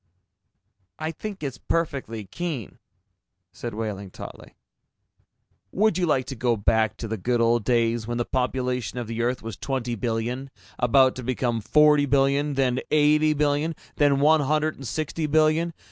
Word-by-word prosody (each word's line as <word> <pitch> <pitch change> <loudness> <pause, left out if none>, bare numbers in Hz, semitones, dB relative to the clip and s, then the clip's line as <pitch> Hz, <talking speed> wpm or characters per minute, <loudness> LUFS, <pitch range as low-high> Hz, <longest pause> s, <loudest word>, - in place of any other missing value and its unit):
"I 160 +1 -3
think 195 +2 -7
it's 135 -4 -4
perfectly 135 -10 -2
keen," 145 - -5 0.7
said 120 -3 -6
Wehling 105 -3 -4
tautly. - - -11 1.2
"Would 205 -2 +2
you 175 - +1
like 130 -4 +1
to 135 +1 -6
go 120 -1 +1
back 110 +1 +1
to 115 - -5
the 110 +1 -3
good 120 +5 0
old 115 -1 +3
days, 115 -1 +1
when 120 0 -2
the 120 - -1
population 125 -1 -2
of 120 - -3
the 115 +1 -4
Earth 120 0 -1
was 115 -3 -6
twenty 130 -3 -3
billion 120 +4 -3 0.3
about 130 +2 +4
to 130 - -6
become 120 -2 -1
forty 150 +3 +4
billion, 140 +1 +2
then 130 -2 +1
eighty 155 +1 +4
billion, 150 +2 0 0.2
then 145 -2 +3
one 155 +2 +5
hundred 155 +2 +1
and 135 - -9
sixty 155 +5 -2
billion? 155 +2 +2
130 Hz, 160 wpm, -25 LUFS, 115-150 Hz, 1.2 s, one